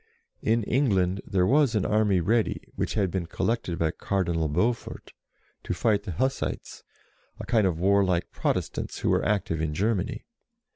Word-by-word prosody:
In 115 Hz, +1 st, +1 dB
England 100 Hz, -7 st, +1 dB
there 95 Hz, -2 st, +2 dB
was 135 Hz, +1 st, +3 dB
an 105 Hz, -, +1 dB
army 105 Hz, -4 st, +2 dB
ready, 110 Hz, +6 st, +1 dB
which -, -, -2 dB
had 100 Hz, -5 st, +1 dB
been 90 Hz, -3 st, -2 dB
collected 90 Hz, -2 st, -1 dB
by 80 Hz, -1 st, +1 dB
Cardinal 85 Hz, -4 st, -1 dB
Beaufort, 115 Hz, +11 st, -2 dB, 0.5 s
to -, -, -3 dB
fight 105 Hz, -2 st, +1 dB
the 95 Hz, -, -4 dB
Hussites, 130 Hz, -, -2 dB, 0.6 s
a -, -, -6 dB
kind 110 Hz, -5 st, +3 dB
of 85 Hz, -3 st, -2 dB
warlike 95 Hz, -2 st, +2 dB
Protestants -, -, -2 dB
who -, -, +1 dB
were -, -, +2 dB
active 95 Hz, -6 st, 0 dB
in 75 Hz, -1 st, -2 dB
Germany. 100 Hz, +1 st, -1 dB
100 Hz, 155 wpm, -26 LUFS, 90-110 Hz, 0.6 s, was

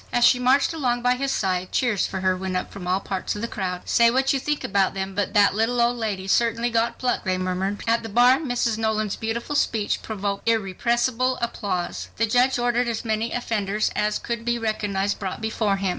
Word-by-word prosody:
As 240 Hz, 0 st, +4 dB
she 250 Hz, -, +5 dB
marched 265 Hz, +6 st, +3 dB
along 245 Hz, -6 st, -1 dB
by 250 Hz, 0 st, +4 dB
his 270 Hz, +2 st, -2 dB
side, 185 Hz, -2 st, -1 dB
cheers 235 Hz, -7 st, +1 dB
for 190 Hz, -, -5 dB
her 185 Hz, 0 st, +2 dB
went 185 Hz, 0 st, -3 dB
up 185 Hz, -, -4 dB
from 185 Hz, -3 st, -8 dB
all 185 Hz, +1 st, +1 dB
parts 190 Hz, 0 st, -3 dB
of 210 Hz, -, -5 dB
the -, -, -1 dB
crowd. 180 Hz, -4 st, -4 dB
"Say 235 Hz, 0 st, +5 dB
what 265 Hz, +3 st, +2 dB
you 275 Hz, -, 0 dB
think 295 Hz, +2 st, -2 dB
about 195 Hz, -1 st, +1 dB
them, 190 Hz, 0 st, -3 dB
but 205 Hz, +2 st, -2 dB
that 205 Hz, -2 st, +5 dB
little 225 Hz, +4 st, 0 dB
old 235 Hz, +1 st, +3 dB
lady 215 Hz, -5 st, -3 dB
has 195 Hz, -, -2 dB
certainly 235 Hz, 0 st, +1 dB
got 230 Hz, 0 st, 0 dB
pluck," 250 Hz, -1 st, -1 dB
they 185 Hz, -1 st, 0 dB
murmured. 185 Hz, +2 st, -2 dB
At 230 Hz, 0 st, +2 dB
the 225 Hz, -, -7 dB
bar 245 Hz, +4 st, +5 dB
Mrs. 245 Hz, -6 st, -1 dB
Nolan's 215 Hz, -2 st, 0 dB
beautiful 235 Hz, +5 st, -3 dB
speech 220 Hz, -7 st, 0 dB
provoked 200 Hz, 0 st, -3 dB
irrepressible 235 Hz, +4 st, +1 dB
applause. 200 Hz, -7 st, -3 dB
The 230 Hz, -, +2 dB
judge 250 Hz, +4 st, +2 dB
ordered 245 Hz, 0 st, +1 dB
as 230 Hz, 0 st, -3 dB
many 220 Hz, +1 st, -1 dB
offenders 215 Hz, -3 st, -1 dB
as 210 Hz, 0 st, +1 dB
could 235 Hz, -1 st, -4 dB
be 240 Hz, 0 st, 0 dB
recognized 205 Hz, -3 st, -1 dB
brought 190 Hz, -2 st, -4 dB
before 220 Hz, -2 st, 0 dB
him. 195 Hz, -1 st, -1 dB
225 Hz, 220 wpm, -24 LUFS, 195-240 Hz, -, she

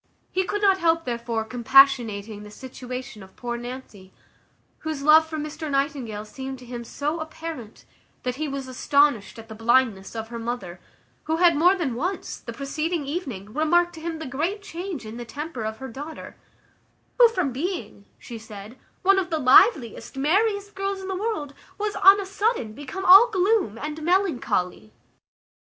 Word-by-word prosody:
He 375 Hz, 0 st, 0 dB
could 415 Hz, +3 st, -3 dB
not 390 Hz, -1 st, +4 dB
help, 330 Hz, -1 st, +2 dB
therefore, 235 Hz, -2 st, -2 dB
compassionating 230 Hz, -3 st, +3 dB
the 210 Hz, -, -10 dB
situation 250 Hz, 0 st, -8 dB
of 190 Hz, 0 st, -15 dB
poor 240 Hz, -1 st, -4 dB
Nancy, 240 Hz, -6 st, -9 dB, 0.7 s
whose 310 Hz, -3 st, -4 dB
love 315 Hz, +2 st, +6 dB
for 315 Hz, -1 st, -5 dB
Mr 305 Hz, +1 st, -5 dB
Nightingale 275 Hz, -7 st, -2 dB
seemed 265 Hz, +4 st, -7 dB
to 250 Hz, -, -13 dB
him 240 Hz, -1 st, -7 dB
so 295 Hz, +7 st, -3 dB
apparent, 315 Hz, -7 st, -8 dB, 0.4 s
that 250 Hz, 0 st, -3 dB
he 310 Hz, +1 st, -2 dB
was 275 Hz, -1 st, -5 dB
astonished 280 Hz, -4 st, +1 dB
at 225 Hz, 0 st, -11 dB
the 220 Hz, -, -9 dB
blindness 225 Hz, -3 st, +1 dB
of 225 Hz, 0 st, -5 dB
her 235 Hz, 0 st, -6 dB
mother, 230 Hz, -7 st, -5 dB, 0.5 s
who 315 Hz, -, 0 dB
had 340 Hz, -1 st, +4 dB
more 355 Hz, +6 st, +5 dB
than 320 Hz, -10 st, -2 dB
once, 355 Hz, +11 st, -4 dB
the -, -, -8 dB
preceding 305 Hz, +3 st, -3 dB
evening, 255 Hz, -, -5 dB
remarked 345 Hz, +4 st, +2 dB
to 320 Hz, -, -10 dB
him 330 Hz, 0 st, -4 dB
the 320 Hz, -, -7 dB
great 325 Hz, +10 st, -3 dB
change 350 Hz, -, -6 dB
in 220 Hz, +2 st, -8 dB
the 240 Hz, -, -5 dB
temper 280 Hz, 0 st, -6 dB
of 220 Hz, 0 st, -4 dB
her 265 Hz, -, -7 dB
daughter, 290 Hz, +6 st, -9 dB, 0.8 s
"who 480 Hz, -2 st, +8 dB
from 365 Hz, -11 st, -1 dB
being," 255 Hz, -, -5 dB
she 235 Hz, -2 st, -9 dB
said, 215 Hz, +2 st, -11 dB, 0.2 s
"one 390 Hz, +1 st, +5 dB
of 365 Hz, -2 st, -3 dB
the 320 Hz, -, 0 dB
liveliest, 260 Hz, -, +4 dB
merriest 405 Hz, +7 st, +1 dB
girls 390 Hz, 0 st, -3 dB
in 380 Hz, 0 st, -7 dB
the 380 Hz, -, -2 dB
world, 380 Hz, -8 st, -3 dB, 0.2 s
was, 420 Hz, 0 st, -2 dB
on 390 Hz, +1 st, +7 dB
a 400 Hz, -, -3 dB
sudden, 400 Hz, -, -1 dB
become 290 Hz, -, -7 dB
all 390 Hz, +7 st, +9 dB
gloom 385 Hz, -, +1 dB
and 300 Hz, +4 st, -5 dB
melancholy." 305 Hz, -, 0 dB
280 Hz, 175 wpm, -24 LUFS, 235-350 Hz, 0.8 s, all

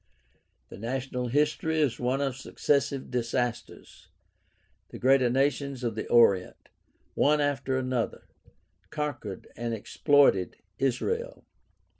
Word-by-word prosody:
The -, -, -11 dB
national 125 Hz, +2 st, -3 dB
history 150 Hz, +4 st, +1 dB
is 135 Hz, -6 st, +1 dB
one 125 Hz, +3 st, 0 dB
of 135 Hz, -2 st, -1 dB
successive 140 Hz, 0 st, -1 dB
disasters. 120 Hz, 0 st, -3 dB, 0.8 s
The -, -, -9 dB
greater 130 Hz, -1 st, +4 dB
nations 135 Hz, 0 st, 0 dB
of 115 Hz, -2 st, -1 dB
the 110 Hz, -, -5 dB
Orient, 100 Hz, -6 st, +3 dB, 0.4 s
one 150 Hz, +1 st, +3 dB
after 140 Hz, -2 st, 0 dB
another, 130 Hz, -3 st, -2 dB, 0.7 s
conquered 130 Hz, -10 st, -5 dB
and 115 Hz, 0 st, -3 dB
exploited 125 Hz, -, +3 dB, 0.2 s
Israel. 460 Hz, -, -2 dB
130 Hz, 105 wpm, -28 LUFS, 120-140 Hz, 0.8 s, greater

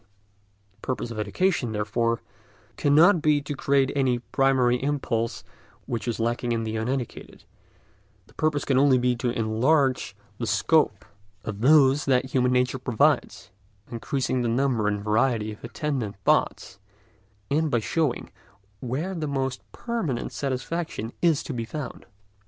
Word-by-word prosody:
The 100 Hz, -, -36 dB
purpose 125 Hz, -2 st, -3 dB
of 110 Hz, -, -5 dB
education, 120 Hz, -, 0 dB
therefore, 115 Hz, +2 st, -1 dB, 0.5 s
cannot 160 Hz, +5 st, +5 dB
be 150 Hz, -2 st, +3 dB
to 145 Hz, +1 st, -4 dB
create 135 Hz, 0 st, +2 dB
any 130 Hz, -3 st, +2 dB
primary 125 Hz, -1 st, +1 dB
impulse 130 Hz, -5 st, -2 dB, 0.4 s
which 120 Hz, -1 st, -4 dB
is 115 Hz, -2 st, -2 dB
lacking 120 Hz, +1 st, -1 dB
in 115 Hz, -1 st, -1 dB
the 110 Hz, 0 st, -3 dB
uneducated; 120 Hz, +2 st, -4 dB, 0.8 s
the -, -, -23 dB
purpose 155 Hz, -2 st, 0 dB
can 130 Hz, -2 st, +2 dB
only 135 Hz, -2 st, +5 dB
be 125 Hz, 0 st, +1 dB
to 120 Hz, +1 st, -1 dB
enlarge 120 Hz, 0 st, +1 dB, 0.2 s
the 115 Hz, -, -2 dB
scope 145 Hz, -11 st, +2 dB, 0.4 s
of 105 Hz, -1 st, -6 dB
those 140 Hz, +1 st, +5 dB
that 130 Hz, -1 st, +1 dB
human 125 Hz, -1 st, +2 dB
nature 125 Hz, 0 st, +1 dB
provides, 125 Hz, -5 st, 0 dB, 0.3 s
by -, -, -25 dB
increasing 130 Hz, +1 st, -1 dB
the 120 Hz, -, 0 dB
number 120 Hz, -3 st, +1 dB
and 105 Hz, -1 st, -1 dB
variety 110 Hz, 0 st, +1 dB
of 105 Hz, -, -12 dB
attendant 125 Hz, -5 st, -3 dB
thoughts, 95 Hz, -, +1 dB, 0.7 s
and 155 Hz, +2 st, +2 dB
by 120 Hz, -, +2 dB
showing 140 Hz, +4 st, -1 dB, 0.5 s
where 140 Hz, +10 st, -3 dB
the 160 Hz, -4 st, -3 dB
most 135 Hz, -2 st, -2 dB
permanent 205 Hz, -, -3 dB
satisfaction 135 Hz, -2 st, -3 dB
is 165 Hz, -4 st, +3 dB
to 145 Hz, -, -5 dB
be 115 Hz, -2 st, -3 dB
found. 145 Hz, +5 st, -7 dB
125 Hz, 145 wpm, -25 LUFS, 115-145 Hz, 0.8 s, cannot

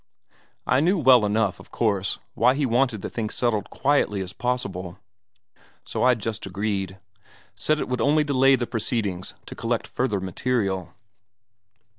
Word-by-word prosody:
I 130 Hz, -, +3 dB
knew 180 Hz, +7 st, +3 dB
well 130 Hz, -7 st, +6 dB
enough, 105 Hz, -1 st, 0 dB
of -, -, -14 dB
course, 100 Hz, -4 st, 0 dB, 0.2 s
why 125 Hz, +3 st, +3 dB
he 145 Hz, 0 st, +1 dB
wanted 120 Hz, -4 st, +1 dB
the -, -, -3 dB
thing 110 Hz, -2 st, -3 dB
settled 110 Hz, -4 st, -1 dB
quietly 135 Hz, -8 st, +1 dB
as 95 Hz, -1 st, -6 dB
possible, 100 Hz, -8 st, -3 dB, 0.9 s
so -, -, -3 dB
I 125 Hz, 0 st, +5 dB
just 110 Hz, -1 st, -4 dB
agreed: 95 Hz, -1 st, -2 dB, 0.6 s
said 155 Hz, 0 st, 0 dB
it -, -, -2 dB
would 125 Hz, -2 st, -2 dB
only 150 Hz, +4 st, +3 dB
delay 135 Hz, -2 st, +4 dB
the 120 Hz, -2 st, -2 dB
proceedings 110 Hz, -5 st, -2 dB
to -, -, -8 dB
collect -, -, -2 dB
further 100 Hz, -, -1 dB
material.... 95 Hz, -1 st, -2 dB
115 Hz, 150 wpm, -24 LUFS, 100-130 Hz, 0.9 s, well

